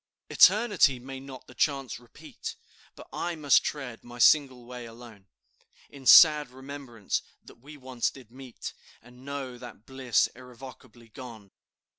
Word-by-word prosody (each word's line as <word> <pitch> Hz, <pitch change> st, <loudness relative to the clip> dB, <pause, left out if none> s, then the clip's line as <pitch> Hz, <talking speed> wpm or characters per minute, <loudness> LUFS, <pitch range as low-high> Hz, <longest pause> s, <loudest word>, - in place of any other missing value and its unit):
"Eternity 205 Hz, -, +4 dB
may 130 Hz, +2 st, -9 dB
not 130 Hz, -1 st, -11 dB
the -, -, -16 dB
chance 135 Hz, -6 st, -1 dB
repeat, 120 Hz, -1 st, -10 dB, 0.4 s
But -, -, -13 dB
I 175 Hz, 0 st, -3 dB
must 150 Hz, -3 st, +3 dB
tread 135 Hz, -6 st, -6 dB
my 120 Hz, 0 st, -12 dB
single 130 Hz, -1 st, +3 dB
way 125 Hz, -1 st, -9 dB
alone, 115 Hz, -4 st, -14 dB, 0.6 s
In 135 Hz, -2 st, -10 dB
sad 150 Hz, -4 st, +8 dB
remembrance 130 Hz, -4 st, -6 dB, 0.2 s
that -, -, -17 dB
we 145 Hz, +4 st, -13 dB
once 130 Hz, -3 st, -3 dB
did 125 Hz, -4 st, -16 dB
meet, 130 Hz, -2 st, -10 dB, 0.3 s
And 125 Hz, +1 st, -17 dB
know 135 Hz, -3 st, -7 dB
that 120 Hz, -3 st, -12 dB
bliss 130 Hz, -4 st, 0 dB
irrevocably 125 Hz, -2 st, -14 dB
gone. 110 Hz, -4 st, -12 dB
130 Hz, 140 wpm, -27 LUFS, 120-140 Hz, 0.6 s, sad